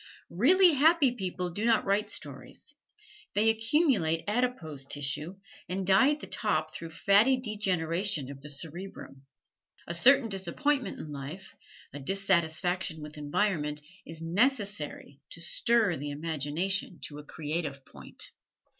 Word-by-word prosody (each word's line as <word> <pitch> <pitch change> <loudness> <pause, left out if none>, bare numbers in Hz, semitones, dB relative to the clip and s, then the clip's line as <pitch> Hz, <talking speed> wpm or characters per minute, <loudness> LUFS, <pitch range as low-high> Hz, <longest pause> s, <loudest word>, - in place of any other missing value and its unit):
Really 345 - +5
happy 295 -1 +4
people 180 -5 -4
do 205 +6 -4
not 230 -1 +3
write 200 +2 +1
stories 140 - -5 0.6
they 220 +2 +5
accumulate 225 - +1
adipose 210 - -1
tissue 145 +5 -1 0.3
and 190 +1 -2
die 195 +9 +5
at 300 0 -1
the - - -6
top 155 -8 -1
through 165 +1 -7
fatty 200 +10 +4
degeneration 190 - -1
of 135 -1 -11
the 150 - -9
cerebrum. 150 -2 -7 0.6
A 170 - -4
certain 255 +8 +5
disappointment 230 - -1
in 150 - -8
life, 145 +7 -8 0.4
a 145 - -6
dissatisfaction 175 -1 0
with 150 +1 -9
environment, 150 -1 -1 0.2
is 165 0 -10
necessary 200 - 0
to - - -7
stir 210 +2 +3
the 145 +2 -5
imagination 160 +5 -2
to 145 +2 -7
a - - -9
creative 150 -2 -4
point. - - -9
180 Hz, 130 wpm, -29 LUFS, 150-215 Hz, 0.6 s, Really